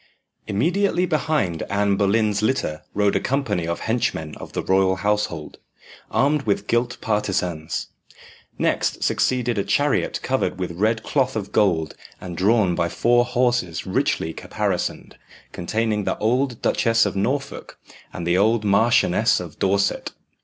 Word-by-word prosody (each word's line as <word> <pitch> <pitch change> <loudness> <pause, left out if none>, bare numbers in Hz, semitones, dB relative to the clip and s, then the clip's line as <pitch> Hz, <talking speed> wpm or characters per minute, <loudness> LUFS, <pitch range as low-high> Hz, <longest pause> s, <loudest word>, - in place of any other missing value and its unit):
Immediately 175 - +1
behind 150 - 0
Anne 100 0 +1
Boleyn's 105 +1 +1
litter 110 -10 -1
rode 100 -1 +2
a - - +3
company 130 -11 -1
of 85 - -3
henchmen 80 -9 -1
of - - -10
the - - -2
royal 95 0 +3
household, 100 -6 -2 0.5
armed 145 +2 +2
with 105 -5 -1
gilt 120 +2 0
partisans. 90 -6 -2 0.7
Next - - 0
succeeded 120 -3 +1
a - - +1
chariot 145 +8 +1
covered 130 -7 -1
with 90 -2 -3
red 110 +6 0
cloth 135 -5 0
of 100 -2 -4
gold, 85 -7 +1 0.3
and 90 -2 -7
drawn 100 0 +3
by 85 0 0
four 120 +7 +3
horses 120 -9 0
richly 80 - 0
caparisoned, - - -3 0.3
containing 105 +3 -1
the - - -1
old 125 +2 0
Duchess 115 -1 +3
of 100 - -2
Norfolk 140 +8 -3 0.3
and 85 - -6
the 85 +2 +2
old 110 +2 +3
Marchioness 110 +4 +3
of - - -9
Dorset. 100 +1 0
105 Hz, 140 wpm, -22 LUFS, 95-120 Hz, 0.7 s, a